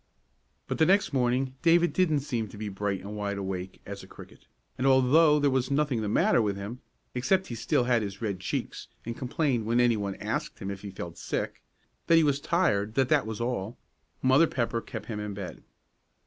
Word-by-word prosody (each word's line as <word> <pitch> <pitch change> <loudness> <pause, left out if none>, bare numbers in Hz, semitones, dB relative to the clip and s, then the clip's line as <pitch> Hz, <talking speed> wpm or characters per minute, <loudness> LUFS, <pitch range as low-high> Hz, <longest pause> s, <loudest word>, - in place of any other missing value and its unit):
But - - -4
the 160 - +6
next 195 -4 +3
morning 130 0 +1
David 170 +1 +4
didn't 155 -6 +2
seem 120 -6 -2
to 105 - -12
be 105 0 -4
bright 100 -1 -2
and 100 +2 -7
wide 100 -1 -2
awake 95 -1 -5
as - - -7
a - - -13
cricket, - - -14 0.3
and 130 - 0
although 145 +4 +5
there 145 -1 +3
was 130 -1 0
nothing 140 -4 +1
the 105 - -2
matter 115 - +3
with 105 -2 0
him, 105 +6 -6 0.3
except 185 +10 +1
he - - -4
still 115 +2 +1
had 120 -2 +2
his 100 -1 -5
red 100 -5 -2
cheeks 95 - -4 0.2
and 115 0 -4
complained 125 -3 -1
when 120 +2 +2
any 120 -2 +4
one 100 -2 -3
asked - - -3
him 95 - -5
if 100 -1 -7
he 100 - -6
felt 85 -3 -8
sick, - - -3 0.5
that 165 - +6
he 165 - +6
was 145 -2 +2
tired, 115 - +1
that 130 -2 +2
that - - +3
was 110 -2 -5
all, 115 -3 -3 0.5
Mother 135 +6 +5
Pepper 115 -3 -1
kept 110 -2 -7
him 105 -1 -5
in 105 -1 -4
bed. 95 -3 -7
120 Hz, 210 wpm, -28 LUFS, 105-140 Hz, 0.5 s, the